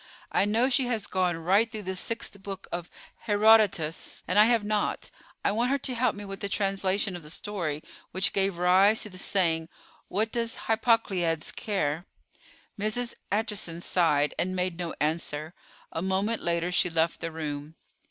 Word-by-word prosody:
I -, -, +3 dB
know 225 Hz, +5 st, +2 dB
she 260 Hz, -1 st, +2 dB
has 225 Hz, -4 st, -1 dB
gone 180 Hz, -2 st, 0 dB
right 195 Hz, +7 st, +2 dB
through 215 Hz, -3 st, -5 dB
the 190 Hz, 0 st, -3 dB
sixth 200 Hz, 0 st, -3 dB
book 195 Hz, -1 st, -7 dB
of 175 Hz, 0 st, -4 dB, 0.4 s
Herodotus, 205 Hz, -6 st, +3 dB
and 185 Hz, +4 st, +3 dB
I 210 Hz, -, +9 dB
have 230 Hz, -2 st, +3 dB
not. 210 Hz, 0 st, -1 dB, 0.3 s
I -, -, +4 dB
want 235 Hz, +4 st, +1 dB
her 280 Hz, -, +2 dB
to 260 Hz, -1 st, -1 dB
help 245 Hz, -1 st, +1 dB
me 205 Hz, 0 st, -7 dB
with 195 Hz, 0 st, -7 dB
the 200 Hz, -, -3 dB
translation 195 Hz, -1 st, 0 dB
of 175 Hz, -, -7 dB
the 150 Hz, -, -11 dB
story 165 Hz, -5 st, -3 dB, 0.3 s
which 185 Hz, +2 st, +1 dB
gave 195 Hz, -2 st, +1 dB
rise 190 Hz, +5 st, +5 dB
to 210 Hz, -, -7 dB
the 185 Hz, -, -7 dB
saying 165 Hz, -5 st, +1 dB, 0.4 s
'What 220 Hz, +3 st, 0 dB
does 230 Hz, -1 st, -1 dB
Hippocleides 195 Hz, -8 st, +1 dB
care?'" 170 Hz, -5 st, -2 dB, 0.7 s
Mrs. 225 Hz, +4 st, -1 dB, 0.2 s
Acheson 205 Hz, -5 st, -1 dB
sighed, 150 Hz, -5 st, +2 dB
and 185 Hz, +1 st, 0 dB
made 180 Hz, -1 st, -1 dB
no 170 Hz, -2 st, -3 dB
answer: 155 Hz, 0 st, -1 dB, 0.4 s
a 165 Hz, -, -3 dB
moment 195 Hz, +4 st, 0 dB
later 170 Hz, +1 st, 0 dB
she 180 Hz, -, +3 dB
left 165 Hz, 0 st, +1 dB
the 165 Hz, -, -4 dB
room. 150 Hz, -1 st, -5 dB
195 Hz, 170 wpm, -28 LUFS, 170-215 Hz, 0.7 s, I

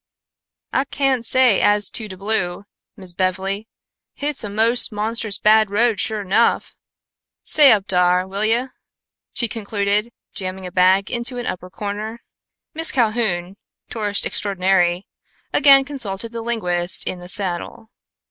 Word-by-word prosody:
"Ah 265 Hz, -, +1 dB
cain' 270 Hz, -3 st, 0 dB
say 245 Hz, -2 st, +3 dB
as 205 Hz, 0 st, +2 dB
to 220 Hz, -, -3 dB
de 190 Hz, -2 st, -10 dB
blue, 195 Hz, -2 st, -2 dB, 0.3 s
Miss 185 Hz, -2 st, -7 dB
Bev'ly. 190 Hz, +3 st, -2 dB, 0.5 s
Hit's 290 Hz, -3 st, -3 dB
a 210 Hz, -, -5 dB
mos' 225 Hz, +5 st, +4 dB
monstrous 215 Hz, 0 st, +1 dB
bad 215 Hz, -1 st, +4 dB
road, 225 Hz, +1 st, +1 dB
sho 215 Hz, -2 st, -2 dB
'nough. 200 Hz, +5 st, +1 dB, 0.7 s
Stay 295 Hz, -3 st, +5 dB
up 205 Hz, -3 st, +2 dB
dar, 180 Hz, 0 st, +2 dB
will 200 Hz, +2 st, -4 dB
yo'!" 235 Hz, +4 st, 0 dB, 0.6 s
she 235 Hz, -, -1 dB
concluded, 210 Hz, 0 st, -2 dB, 0.2 s
jamming 185 Hz, -1 st, -6 dB
a 180 Hz, -, -7 dB
bag 190 Hz, +2 st, +2 dB
into 240 Hz, +1 st, -2 dB
an 245 Hz, -, -5 dB
upper 180 Hz, 0 st, -5 dB
corner. 210 Hz, +4 st, -6 dB, 0.5 s
Miss 325 Hz, 0 st, +1 dB
Calhoun, 215 Hz, -7 st, -1 dB, 0.3 s
tourist 210 Hz, -3 st, -1 dB
extraordinary, 185 Hz, -2 st, +1 dB, 0.5 s
again 275 Hz, -2 st, +6 dB
consulted 230 Hz, -6 st, -4 dB
the 230 Hz, -1 st, -6 dB
linguist 180 Hz, -6 st, 0 dB
in 185 Hz, -, -4 dB
the 180 Hz, 0 st, -12 dB
saddle. 200 Hz, +4 st, -2 dB
210 Hz, 140 wpm, -20 LUFS, 190-235 Hz, 0.7 s, again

